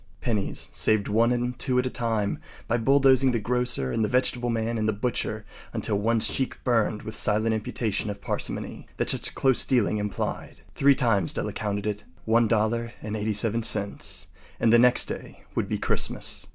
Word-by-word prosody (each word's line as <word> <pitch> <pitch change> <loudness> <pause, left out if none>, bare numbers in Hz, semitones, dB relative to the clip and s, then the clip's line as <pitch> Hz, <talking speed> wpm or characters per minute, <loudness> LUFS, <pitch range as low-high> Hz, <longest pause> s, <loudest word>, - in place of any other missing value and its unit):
Pennies 105 -5 -2
saved 110 -2 +2
one 115 +3 +3
and 125 0 -2
two 130 -3 +1
at 125 - +2
a - - 0
time 110 -4 -1 0.3
by 120 - +1
bulldozing 135 +1 +4
the 115 - +1
grocer 120 - 0
and 115 - 0
the - - +2
vegetable 125 -1 +1
man 115 0 -1
and 110 0 +1
the - - +1
butcher 110 0 -2 0.3
until 100 - 0
one’s 115 +1 +2
cheeks 130 - -1
burned 115 -4 +1
with 110 - -6
the - - -2
silent 110 +2 +2
imputation 110 -1 -2
of 100 - -5
parsimony - - -4
that - - 0
such - - -4
close 130 -4 +3
dealing 110 -4 +1
implied. 105 -1 -4
Three 140 0 +4
times 115 -9 +1
Della - - -2
counted 100 -1 -3
it. 105 0 -3 0.2
One 115 +1 +3
dollar 115 +2 0
and 105 0 -4
eighty 110 0 -1
seven 115 +2 +1
cents. 105 -3 -1 0.3
And 115 0 +3
the 120 - +7
next 125 +1 +5
day - - -8
would - - -2
be - - 0
Christmas. - - 0
115 Hz, 190 wpm, -26 LUFS, 105-120 Hz, 0.3 s, the